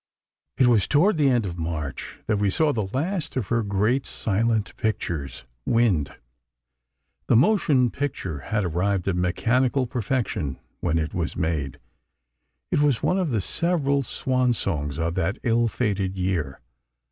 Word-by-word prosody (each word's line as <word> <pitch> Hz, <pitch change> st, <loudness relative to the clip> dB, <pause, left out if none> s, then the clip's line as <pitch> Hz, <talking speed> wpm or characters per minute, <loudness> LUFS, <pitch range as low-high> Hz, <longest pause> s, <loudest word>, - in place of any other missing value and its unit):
It 130 Hz, -, +5 dB
was 115 Hz, -5 st, +4 dB
toward 170 Hz, +6 st, +3 dB
the 145 Hz, -3 st, +4 dB
end 120 Hz, -4 st, +2 dB
of 85 Hz, -2 st, -5 dB
March 75 Hz, -4 st, -5 dB
that 105 Hz, -2 st, 0 dB
we 100 Hz, -1 st, +2 dB
saw 150 Hz, +8 st, +2 dB
the 110 Hz, -4 st, -1 dB
last 165 Hz, +4 st, -2 dB
of 125 Hz, -7 st, -2 dB
her 115 Hz, 0 st, +2 dB
great 105 Hz, +6 st, 0 dB
silent 110 Hz, 0 st, 0 dB
pictures, 85 Hz, -10 st, -3 dB, 0.2 s
"Wind." 95 Hz, -, +1 dB, 1.1 s
The -, -, +4 dB
motion 135 Hz, -, +4 dB
picture 95 Hz, -, -3 dB
had 105 Hz, +7 st, -1 dB
arrived 90 Hz, +3 st, 0 dB
at 95 Hz, -, +1 dB
mechanical 125 Hz, +9 st, +1 dB
perfection 110 Hz, -, -2 dB, 0.2 s
when 80 Hz, -, 0 dB
it 80 Hz, -1 st, -2 dB
was 85 Hz, -3 st, -2 dB
made. 80 Hz, -6 st, -2 dB, 0.9 s
It -, -, +2 dB
was 145 Hz, -6 st, +2 dB
one 185 Hz, -, +2 dB
of 180 Hz, -4 st, 0 dB
the 110 Hz, -6 st, 0 dB
several 145 Hz, -, 0 dB
"swan 130 Hz, -1 st, 0 dB
songs" 75 Hz, -9 st, -2 dB
of 85 Hz, 0 st, -1 dB
that 90 Hz, +6 st, -1 dB
ill 120 Hz, -1 st, +2 dB
fated 100 Hz, -5 st, -1 dB
year. 90 Hz, -7 st, -2 dB
110 Hz, 150 wpm, -24 LUFS, 90-130 Hz, 1.1 s, It